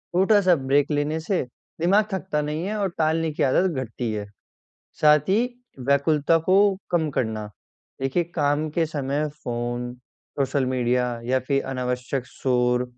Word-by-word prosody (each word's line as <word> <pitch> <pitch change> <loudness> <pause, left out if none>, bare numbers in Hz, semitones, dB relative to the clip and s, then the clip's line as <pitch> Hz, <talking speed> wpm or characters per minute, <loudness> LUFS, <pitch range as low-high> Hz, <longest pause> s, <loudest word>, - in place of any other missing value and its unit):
छोटा-सा 190 0 +5
ब्रेक 140 +1 +1
लेने 150 +2 0
से 175 +4 -1 0.4
दिमाग 200 +5 +4
थकता 190 -5 -1
नहीं 150 +3 -3
है 210 +2 -2
और 200 -2 0
टालने 160 0 +1
की - - -1
आदत 175 +8 +3
घटती 115 0 -4
है। 105 -1 -3 0.8
साथ 150 0 +5
ही, 195 +3 +4 0.5
व्याकुलता 145 +3 +3
को 185 - +5 0.4
कम 165 -3 +1
करना। 110 -5 -2 0.5
देखिए, 135 +6 +1
काम 150 -2 0
के 165 - +3
समय 145 -1 -2 0.2
फ़ोन, 120 0 -3 0.5
सोशल 135 -1 +1
मीडिया, 125 0 +1 0.2
या 130 +2 +2
फिर 135 -1 +2
अनावश्यक 125 0 -2
शोर, 125 -1 +1
145 Hz, 145 wpm, -24 LUFS, 125-165 Hz, 0.8 s, छोटा-सा